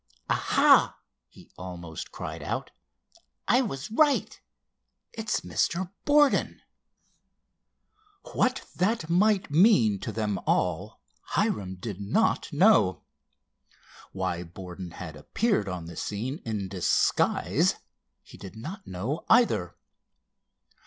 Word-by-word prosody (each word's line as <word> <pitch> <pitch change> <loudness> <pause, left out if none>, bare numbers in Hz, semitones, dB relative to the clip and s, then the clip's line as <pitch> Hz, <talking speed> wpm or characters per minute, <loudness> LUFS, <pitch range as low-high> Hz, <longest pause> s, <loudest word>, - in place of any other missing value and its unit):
"Aha!" - - +4 0.3
he - - -18
almost 85 -3 -7
cried - - -7
out. - - -4 0.8
"I 250 - +4
was 140 - -5
right. 290 +4 +2 0.7
It's 220 -1 -2
Mr. 180 +1 -1
Borden." 290 -1 +3 1.7
What 255 +1 +1
that 185 -3 0
might 200 -1 +2
mean 145 - +4
to - - -5
them 105 -3 -2
all 90 +5 -1 0.3
Hiram 95 -2 0
did 100 +1 -7
not 100 - 0
know. - - +4 1.1
Why 95 -2 -2
Borden 90 +1 -9
had 85 -2 -9
appeared 110 - -1
on 90 -3 -5
the 85 0 -9
scene 120 - -4
in 105 -4 -3
disguise 95 -2 +1 0.5
he - - -15
did 95 +2 -10
not 175 - -8
know, 110 - -4
either. 110 - +3
105 Hz, 105 wpm, -27 LUFS, -, 1.7 s, Aha